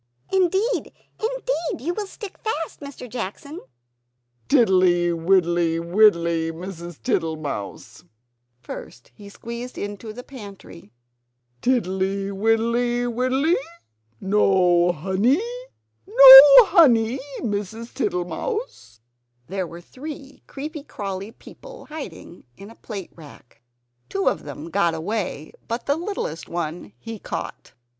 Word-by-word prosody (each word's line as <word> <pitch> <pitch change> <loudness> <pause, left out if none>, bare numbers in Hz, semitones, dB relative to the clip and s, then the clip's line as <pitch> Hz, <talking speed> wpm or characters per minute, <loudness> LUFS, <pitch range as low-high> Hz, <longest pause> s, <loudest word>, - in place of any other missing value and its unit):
"Indeed, 385 +6 +1 0.3
indeed, 465 - -2
you 345 - 0
will 415 +1 -4
stick 410 0 -10
fast, 330 -8 -4
Mr. 280 -3 -9
Jackson!" 250 - -7 0.9
"Tiddly, 185 -9 +4
widdly, 170 -1 +1
widdly, 170 -3 +2
Mrs. 170 -1 -9
Tittlemouse!" 160 - -4 0.6
First 120 0 -10
he 205 -1 -13
squeezed 235 +4 -8
into 205 +2 -6
the 245 +3 -9
pantry. 200 - -12 0.7
"Tiddly, 195 -4 0
widdly, 230 +4 +1
widdly? 255 +6 +1 0.7
No 185 -3 +3
honey? 190 - +1 0.7
No - - +12 0.3
honey, 260 - +4 0.2
Mrs. 220 +1 -4
Tittlemouse?" 255 - -4 0.4
There 190 +2 -4
were 170 +1 -10
three 275 - -10
creepy 300 +2 -7
crawly 200 -6 -6
people - - -14
hiding 295 - -10
in 200 +1 -11
the 230 - -14
plate 200 -5 -8
rack. 145 -7 -16 0.5
Two 195 -1 -2
of - - 0
them 145 +3 -8
got 170 -3 +1
away; 175 -3 -4 0.2
but 230 +2 -4
the 285 - +1
littlest 330 - -5
one 165 -8 -5
he 225 - -8
caught. - - -7
205 Hz, 105 wpm, -22 LUFS, 175-270 Hz, 0.9 s, No